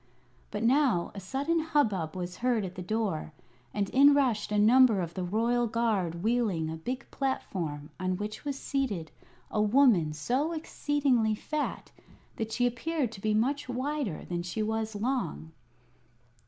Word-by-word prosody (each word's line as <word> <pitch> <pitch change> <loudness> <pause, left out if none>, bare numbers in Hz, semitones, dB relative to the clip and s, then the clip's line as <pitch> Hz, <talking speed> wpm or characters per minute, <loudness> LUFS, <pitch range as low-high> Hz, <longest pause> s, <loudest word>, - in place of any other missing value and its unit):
But 210 - -3
now 250 -7 +3
a 200 - -6
sudden 275 - -1
hubbub 220 - 0
was 180 0 -5
heard 235 -4 +1
at 180 - -6
the 185 - -7
door, 190 -5 -2 0.4
and 200 -1 -1
in 280 +2 +7
rushed 250 -8 +1
a 210 - +1
number 225 0 +6
of 170 -2 -3
the 185 - -3
royal 230 +6 +1
guard 205 -7 0
wheeling 210 -9 +1
a - - -4
big 250 +12 -5
platform 165 - -3
on 185 0 -1
which 210 +2 -5
was 285 -2 -3
seated 225 - -2 0.4
a 210 - +1
woman 210 - +4
so 255 - -1
exceedingly 280 -8 +1
fat 300 +7 -4 0.5
that 220 0 -3
she 245 - +1
appeared 255 +2 -1
to 195 - -10
be 215 0 +1
much 255 +4 0
wider 255 - -2
than 175 -1 -3
she 180 +5 -3
was 220 0 -2
long. 230 -7 -2
220 Hz, 155 wpm, -29 LUFS, 185-265 Hz, 0.5 s, in